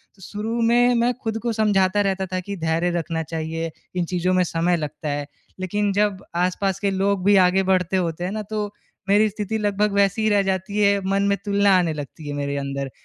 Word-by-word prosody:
तो 195 - -21
शुरू 220 +5 -3
में 245 0 +4
मैं 240 +1 +2
खुद 225 -1 -2
को 240 - 0
समझाता 205 -2 +2
रहता 195 -1 0
था 185 - 0
कि 200 +2 -6
धैर्य 165 +2 0
रखना 165 0 -3
चाहिए 165 +1 -4 0.2
इन 180 - 0
चीज़ों 180 +1 0
में 185 0 +3
समय 170 +1 +1
लगता 150 0 -5
है। 145 0 -3 0.3
लेकिन 205 +2 0
जब 200 -1 0
आस-पास 185 +2 0
के 200 -1 0
लोग 195 0 0
भी 205 0 +6
आगे 190 +1 +2
बढ़ते 185 +1 +1
होते 175 -1 -2
हैं 185 - -2
न 215 0 -3
तो 210 -1 -2 0.4
मेरी 210 +2 +5
स्थिति 210 +1 -3
लगभग 210 0 +1
वैसी 200 +2 +2
ही 220 - +3
रह 205 -1 +4
जाती 190 +1 -2
है 200 -1 +4
मन 200 0 +2
में 200 0 +2
तुलना 200 -1 +4
आने 170 -3 +1
लगती 150 +1 -8
है 145 - -3
मेरे 140 0 -2
अंदर। 140 0 -3
190 Hz, 215 wpm, -22 LUFS, 170-205 Hz, 0.4 s, भी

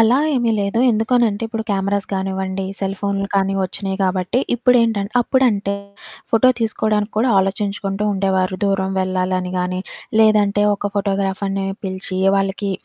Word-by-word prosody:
అలా 225 +3 +5 0.2
ఏమి 240 -3 +1
లేదు. 200 +3 -1
ఎందుకనంటే, 225 -1 +1
ఇప్పుడు 225 0 -3
కెమెరాస్ 200 0 0
గానివ్వండి, 190 0 -2
సెల్ 195 0 -2
ఫోన్లు 200 0 -1
కానీ, 195 0 +2
ఒచ్చినియి 190 +1 -4
గాబట్టి, 185 +4 0 0.2
ఇప్పుడేంటంటే 230 -4 +2
అప్పుడంటే, 220 -7 +1 0.6
ఫోటో 230 +3 +5
తీసుకోడానికి 215 -1 0
కూడా 245 +3 +2
ఆలోచించుకుంటూ 195 +1 -1
ఉండేవారు. 190 -1 0
దూరం 195 -1 0
వెళ్ళాలని 185 -1 -1
గానీ, 185 +1 -2 0.4
లేదంటే 210 -2 +4
ఒక 205 0 -3
ఫోటోగ్రాఫర్‌ని 195 -1 -1 0.2
పిలిచి 185 0 -3 0.2
వాళ్ళకి 195 +1 -1
200 Hz, 125 wpm, -19 LUFS, 190-215 Hz, 0.6 s, అలా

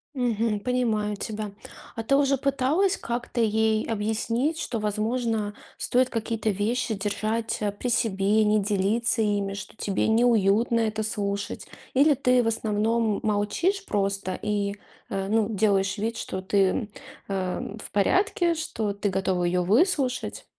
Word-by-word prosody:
Мгм. 230 -4 0
Понимаю 220 -4 0
тебя. 215 -1 -4 0.4
А 225 - -3
ты 250 +5 +2
уже 275 -1 +3
пыталась 280 +9 +1
как-то 240 0 -3
ей 220 0 +2
объяснить, 230 +7 -1
что, 240 -7 -3
возможно, 215 0 -1 0.2
стоит 255 +1 +2
какие-то 225 -1 -2
вещи 220 +4 -1
держать, 215 +3 -2
а, 205 -1 0
при 225 +5 -4
себе, 215 -2 +2
не 210 0 +3
делиться 210 +4 +1
ими, 205 -2 0
что 195 +1 -8
тебе 200 -3 -1
неуютно 225 0 +3
это 220 -1 0
слушать? 200 -1 -3 0.3
Или 290 +3 +5
ты, 250 -1 +3
в - - -1
основном, 220 0 +1
молчишь 220 - 0
просто 195 - -1
и, 205 -1 -1 0.3
а, 195 0 -2
ну, 220 0 +2
делаешь 200 -2 +1
вид, 225 +3 -2
что 185 -4 -4
ты, 190 +2 -1
м, 215 +1 -2 0.4
э, 190 +1 -3
в - - -10
порядке, 345 - +2
что 220 -10 -2
ты 200 0 -1
готова 190 -1 0
её 180 +1 +1
выслушать? 260 - +1
220 Hz, 145 wpm, -26 LUFS, 205-240 Hz, 0.4 s, Или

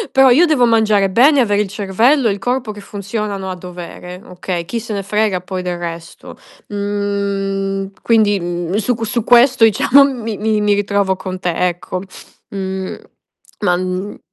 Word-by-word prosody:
Però 270 0 +7
io 300 +8 +6
devo 265 -7 +3
mangiare 215 -3 +3
bene, 270 +8 +5
avere 205 -4 +2
il 210 - -2
cervello 225 +7 +2
e 210 - +2
il 200 - -5
corpo 245 +1 -2
che 205 -1 -10
funzionano 200 -1 -5
a 185 - -4
dovere 180 0 -9
okay. 180 -1 -5
Chi 230 +8 -4
se 225 -1 -6
ne 200 - -2
frega 205 -2 0
poi 185 0 -5
del 180 -1 -3
resto. 170 -1 -8 0.3
Mhmm, 200 -1 -2
quindi, 215 -3 +2
mhmm, 175 +1 -3
su 220 +3 +1
qu 225 -1 -4
su 235 0 -2
questo 245 +1 +5
diciamo 250 +5 +5
mi 230 -6 -4
mi 215 0 0
mi 210 0 +3
ritrovo 200 -1 0
con 185 0 -6
te 180 -1 -1 0.2
ecco. 180 +1 -4 0.5
Mhmm, 190 -1 -4 0.7
ma, 180 -4 +2
mhmm 185 +2 -4
200 Hz, 170 wpm, -17 LUFS, 185-225 Hz, 0.7 s, Però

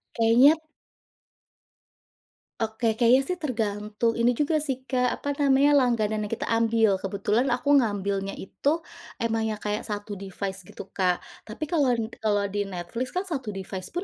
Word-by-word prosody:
Kayaknya 235 +6 +6
t - - -32 2.0
Oke, 225 0 0
kayaknya 245 +2 +5
sih 360 - -1
tergantung 220 -4 -1
ini 240 +1 +3
juga 305 +1 +1
sih 265 -3 -3
Kak, 255 -2 +1
apa 285 - -4
namanya, 280 0 +4
langganan 215 -4 +1
yang - - -13
kita - - -4
ambil. 225 -3 +3
Kebetulan 205 +6 0
aku 250 +4 +1
ngambilnya 200 -3 -1
itu 300 - -1 0.4
emang 225 -1 0
yang 215 - -3
kayak 210 +1 -3
1 205 0 -5
device, 195 0 -5
gitu, - - -9
Kak. 180 -2 +1 0.2
Tapi 220 +7 -6
kalau 295 -4 +1
n 225 0 -3
kalau 205 -2 +1
di 205 - -1
Netflix 185 +7 -4
kan, 365 - 0
1 275 - -4
device-pun 190 - -5
225 Hz, 155 wpm, -26 LUFS, 205-260 Hz, 2.0 s, Kayaknya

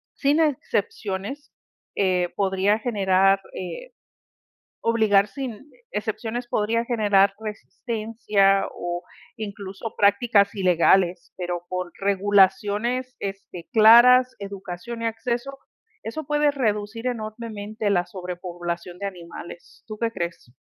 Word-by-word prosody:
sin 290 +3 +2
excepciones, 215 -3 -2 0.4
eh, 180 -3 +1
podría 195 +2 +1
generar, 195 -3 +3
eh, - - -7 0.9
obligar 215 -3 +3
sin 265 +3 -7 0.2
excepciones 225 +3 -3
podría 230 +2 0
generar 205 -4 +3
resistencia 215 -2 0
o 175 0 -4 0.3
incluso 200 0 -6
prácticas 205 0 +4
ilegales, 180 -1 +2
pero 175 -1 -3
por 180 -1 -3
regulaciones, 205 +5 +2
este, 195 -3 -7
claras, 240 +3 +7
educación 200 +3 -7
y - - 0
acceso, 240 +4 -3 0.5
eso 290 +8 -5
puede 295 0 +3
reducir 225 -3 -2
enormemente 215 -2 -4
la 180 -3 +2
sobrepoblación 175 -1 -6
de 200 - -3
animales. 175 -2 -10
¿Tú 215 -1 -7
qué 230 -1 0
crees? 170 - -5
205 Hz, 100 wpm, -24 LUFS, 190-230 Hz, 0.9 s, claras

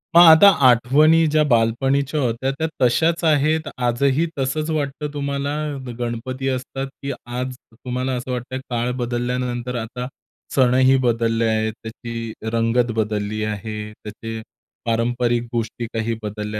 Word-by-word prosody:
मग 170 - +10
आता 165 +3 +9 0.2
आठवणी 150 +7 +5
ज्या 155 0 +3
बालपणीच्या 135 +6 +2
होत्या 125 +1 -1
त्या 160 - 0
तशाच 160 +7 +2
आहेत, 155 +1 +3 0.2
आजही 130 +5 +1
तसंच 150 +4 -1
वाटतं 150 -1 -2
तुम्हाला 140 0 -2 0.5
गणपती 125 +3 -3
असतात, 135 +1 -3
की 140 0 -3 0.2
आज 125 +1 -4 0.2
तुम्हाला 125 +3 -3
असं 125 +1 -5
वाटतं 125 +1 -4
काळ 120 0 -1
बदलल्यानंतर 120 0 -2
आता 125 +2 -5 0.5
सणही 130 0 +5
बदलले 115 -1 +1
आहेत, 110 0 0
त्याची 115 0 -6 0.2
रंगत 115 +1 +2
बदलली 105 -1 -1
आहे. 105 0 -4
त्याचे 110 +1 -7 0.4
पारंपरिक 120 +1 +1
गोष्टी 115 0 -2
काही 115 0 -1
बदलल्या 105 0 -4
125 Hz, 125 wpm, -21 LUFS, 115-135 Hz, 0.5 s, मग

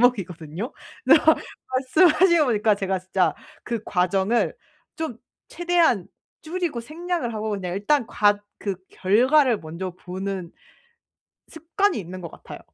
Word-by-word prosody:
과목이거든요. 190 - 0 0.3
그래서 - - +6 0.3
말씀을 260 +6 +4
하시고 340 -2 +5
보니까 215 -2 +3
제가 195 -1 -1
진짜 185 -2 0 0.3
그 235 -3 -3
과정을 190 - +1 0.4
좀 310 -8 -4 0.3
최대한 345 - +2 0.4
줄이고 325 -6 -3
생략을 315 -3 -3
하고 215 0 -3
그냥 185 -3 -3
일단 235 +5 +1
과 205 -2 +2 0.2
그 200 -2 -2
결과를 245 +5 +3
먼저 170 +4 -5
보는 185 0 -5 1.0
습관이 345 - 0
있는 185 0 -8
것 170 - -7
같아요. - - -11
215 Hz, 285 characters per minute, -24 LUFS, 185-300 Hz, 1.0 s, 그래서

